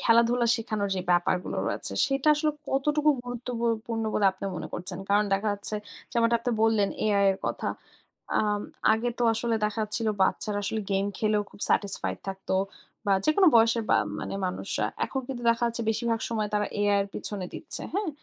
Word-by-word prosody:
খেলাধুলা 235 +1 +3
শেখানোর 215 -3 -3
যে - - -1
ব্যাপারগুলো 175 +1 0
রয়েছে 100 0 +3
সেটা 275 +2 0
আসলে 305 0 0 0.2
কতটুকু 295 +2 +2
গুরুত্ব 245 0 -7
বু 235 - -2 0.2
পূর্ণ 225 -1 -3
বলে 200 - +3
আপনি 190 - -9
মনে - - -6
করছেন? 180 +1 0
কারণ 205 +1 +3
দেখা 205 +2 -1
যাচ্ছে 205 +1 +6 0.4
যেমনটা 235 0 +2
আপনি 245 - -2
বললেন, 220 -3 +3 0.2
AI 200 -2 +2
এর 190 - -8
কথা। - - -3 0.7
আম 210 -1 0 0.3
আগে 225 +2 0
তো - - 0
আসলে 230 +1 0
দেখা 210 +1 -2
যাচ্ছিল 220 +2 -1 0.2
বাচ্চারা 205 +2 0
আসলে 220 +2 -2
গেম 195 +1 +1
খেলেও 215 -1 +1
খুব - - -16
satisfied 200 -2 +2
থাকতো। 190 0 -4 0.5
বা 200 - +3
যেকোনো 360 +5 +4
বয়সের 225 0 +3
বা - - +5 0.2
মানে - - -5
মানুষরা। 180 - -2 0.2
এখন 265 - -3
কিন্তু 245 -3 -5
দেখা 230 +1 -1
যাচ্ছে 235 0 -2
বেশিরভাগ 230 0 -1
সময় 215 -2 -1
তারা 210 0 +1
AI 205 - +2 0.2
এর 195 - -6
পেছনে 195 -3 -3
দিচ্ছে। - - -1
হ্যাঁ? 405 -1 -1
220 Hz, 180 wpm, -26 LUFS, 200-235 Hz, 0.7 s, যাচ্ছে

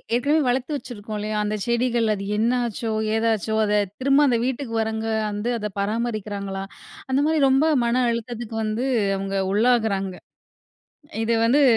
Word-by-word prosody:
ஏற்கனவே 290 +5 +2
வளர்த்து 260 +4 0
வச்சிருக்கோம் 215 -4 -7
இல்லயா! 215 0 -2
அந்தச் 210 -1 -2
செடிகள் 235 -1 +1
அது 195 0 -6
என்ன 230 +3 +2 0.2
ஆச்சோ? 225 +1 -4 0.3
ஏதாச்சோ! 220 -1 0
அதத் 205 -2 0
திரும்ப 275 +2 +4
அந்த 235 -2 +2
வீட்டுக்கு 260 -3 -3
வர்றவங்க 220 0 -2 0.2
வந்து 210 +4 -2
அத 210 0 -3
பராமரிக்கறாங்களா? 205 -3 -3 0.5
அந்தமாரி 295 +3 +2
ரொம்ப 270 +4 +4 0.2
மன 250 +2 +2
அழுத்தத்துக்கு 235 -1 -5
வந்து 215 +4 -1 0.3
அவுங்க 195 0 -3 0.2
உள்ளாகுறாங்க. 210 -5 +2 1.1
இது 230 +1 +1
வந்து. 285 +5 +4
225 Hz, 140 wpm, -23 LUFS, 210-245 Hz, 1.1 s, திரும்ப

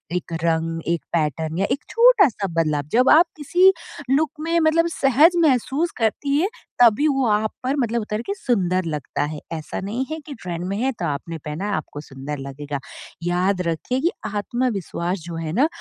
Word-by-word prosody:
एक 170 -1 -4
रंग, 165 0 0
एक 170 -1 0
पैटर्न 160 0 -1
या 195 - +2
एक 280 - -1
छोटा-सा 415 - +4
बदलाव, 155 -4 0
जब 250 +3 +4
आप 330 +3 +7
किसी 355 +6 +5 0.4
लुक 300 +3 +3
में 335 +2 +1
मतलब 330 +1 +3
सहज 285 +4 +5
महसूस 295 +3 +2
करती 275 +5 0
है, 375 - +2 0.3
तभी 240 +6 +6
वो 270 -2 +1
आप 210 +1 +1
पर 260 +2 0
मतलब 235 -3 0
उतर 210 +1 -3
के 400 - -2
सुंदर 185 - 0
लगता 150 -2 -3
है 150 0 -4
ऐसा 155 -2 -5
नहीं 230 +7 -2
है 315 - -3
कि 295 - -7
ट्रेंड 175 -1 -4
में 195 +1 -2
है 260 +5 +1
तो 170 - -1
आपने 160 +3 -3
पहना 150 +6 -4
है - - -1
आपको 145 -1 -5
सुंदर 140 +1 -7
लगेगा। 140 +1 -5 0.4
याद 180 +2 +1
रखिए 170 +10 -1
कि 340 - +2 0.2
आत्मविश्वास 205 -5 -2
जो 170 -1 -6
है 165 -1 -4
ना, 265 - +4
205 Hz, 185 wpm, -22 LUFS, 165-275 Hz, 0.4 s, आप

